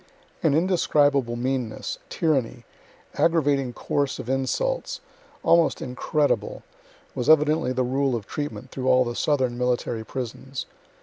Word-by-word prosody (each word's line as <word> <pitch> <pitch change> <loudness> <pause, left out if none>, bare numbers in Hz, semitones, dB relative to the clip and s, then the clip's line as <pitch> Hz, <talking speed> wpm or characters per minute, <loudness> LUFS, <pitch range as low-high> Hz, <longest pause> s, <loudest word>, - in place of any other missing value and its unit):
An 160 -6 +3
indescribable 145 -7 +2
meanness, 125 -2 -3
tyranny, 130 -7 0 0.5
aggravating 145 -6 +2
course 140 +3 -1
of 125 - -4
insults, - - -1 0.4
almost 170 -2 +4
incredible 150 - -1 0.5
was 130 +2 -2
evidently 155 -2 +4
the 130 0 0
rule 135 +1 +1
of 110 -4 -4
treatment 145 -1 -5
through 130 -1 -4
all 130 0 +5
the 120 0 -4
southern 130 -5 0
military 120 -2 -1
prisons. 130 +2 -5
135 Hz, 120 wpm, -25 LUFS, 125-150 Hz, 0.5 s, all